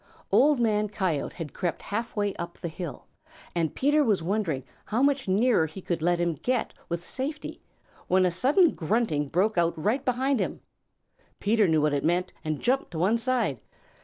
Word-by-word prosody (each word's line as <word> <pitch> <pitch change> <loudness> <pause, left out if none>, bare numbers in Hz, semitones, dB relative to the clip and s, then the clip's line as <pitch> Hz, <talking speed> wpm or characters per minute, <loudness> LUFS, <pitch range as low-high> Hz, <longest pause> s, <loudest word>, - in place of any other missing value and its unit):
Old 290 -1 +5
Man 210 -2 +1
Coyote 185 -8 -2
had 160 -5 -6
crept 175 -2 -3
half 225 +3 -4
way 205 -2 0
up 170 0 -6
the 170 - -5
hill, 160 -1 -7 0.5
and 165 -3 -1
Peter 295 +3 +3
was 205 - +1
wondering 175 -8 -1 0.2
how 230 +5 0
much 280 -3 +2
nearer 205 -3 +3
he 160 +5 -9
could 175 -3 -3
let 175 +1 +2
him 170 -1 +1
get 245 - -1 0.2
with 170 0 -3
safety, 280 - -5 0.5
when 185 0 +4
a 180 - +2
sudden 275 - +4
grunting 160 -5 0
broke 185 +6 +1
out 170 -1 +1
right 215 - 0
behind 260 +1 +1
him. - - -2 0.8
Peter 215 0 +3
knew 160 -2 +3
what 150 -1 +2
it 140 - 0
meant 180 +2 +1
and 155 -1 -3
jumped 265 +3 +1
to 165 - -7
one 200 +8 +2
side. 230 - 0
195 Hz, 185 wpm, -27 LUFS, 170-240 Hz, 0.8 s, Old